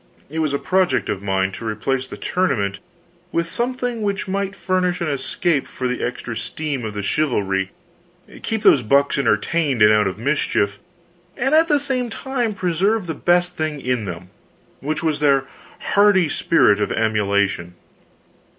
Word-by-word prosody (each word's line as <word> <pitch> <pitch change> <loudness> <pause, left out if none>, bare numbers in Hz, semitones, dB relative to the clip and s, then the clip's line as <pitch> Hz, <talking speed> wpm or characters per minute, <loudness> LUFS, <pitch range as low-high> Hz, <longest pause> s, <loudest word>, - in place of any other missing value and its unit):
It 160 - -3
was 155 -2 +1
a 140 - +1
project 185 +3 +1
of 95 - -2
mine 95 -1 0
to 115 - -9
replace 130 +5 -2
the - - -9
tournament 105 - -1 0.5
with 170 0 0
something 245 +1 -2
which 200 -1 -2
might 195 +1 -2
furnish 185 -1 0
an 170 - -2
escape 145 +2 -1
for 130 - -4
the 125 0 -3
extra 120 -1 -4
steam 140 +3 -4
of 110 -2 -5
the 105 - -3
chivalry, 95 -9 0 0.7
keep 220 -2 -2
those 135 - +6
bucks 140 +5 +2
entertained 135 +2 +1
and 105 0 +7
out 105 -1 +3
of 95 - -4
mischief, 110 -5 0 0.6
and 270 +4 0
at 320 +1 +5
the 295 -2 +3
same 260 -4 -1
time 240 -1 -2
preserve 190 +4 0
the 165 - -3
best 175 +3 +1
thing 155 -2 -2
in 125 -4 -1
them, 90 0 -7 0.5
which 155 +4 -3
was 155 -2 0
their 140 -2 +3 0.5
hardy 200 -4 +5
spirit 105 -10 +3
of 105 - 0
emulation. 100 -5 0
145 Hz, 160 wpm, -21 LUFS, -, 0.7 s, and